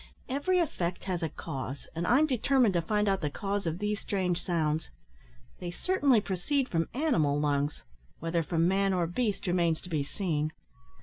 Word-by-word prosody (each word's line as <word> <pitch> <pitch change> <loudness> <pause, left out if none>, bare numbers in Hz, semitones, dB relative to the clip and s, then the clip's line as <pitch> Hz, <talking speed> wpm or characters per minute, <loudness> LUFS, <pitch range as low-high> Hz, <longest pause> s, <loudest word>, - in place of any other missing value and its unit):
Every 285 +8 +1
effect 180 - -1
has 180 -2 -2
a 160 - -1
cause, 135 -3 -6
and 170 +2 -2
I'm 275 +6 +5
determined 255 -4 +3
to 170 - +2
find 210 +4 +1
out 195 -1 +2
the 150 - 0
cause 200 +4 -2
of 165 +1 -1
these 210 +1 -1
strange 180 -3 -1
sounds. 160 -3 0 0.7
They 175 - -4
certainly 280 - +3
proceed 230 - -1
from 165 -1 0
animal 160 - +2
lungs, 145 0 0 0.3
whether 165 +1 0
from 165 +1 +1
man 195 +1 +2
or 180 -2 +2
beast 205 +4 -1
remains 170 -3 +2
to 180 - -10
be 155 -4 0
seen." 155 -1 -2
180 Hz, 175 wpm, -30 LUFS, 165-210 Hz, 0.7 s, I'm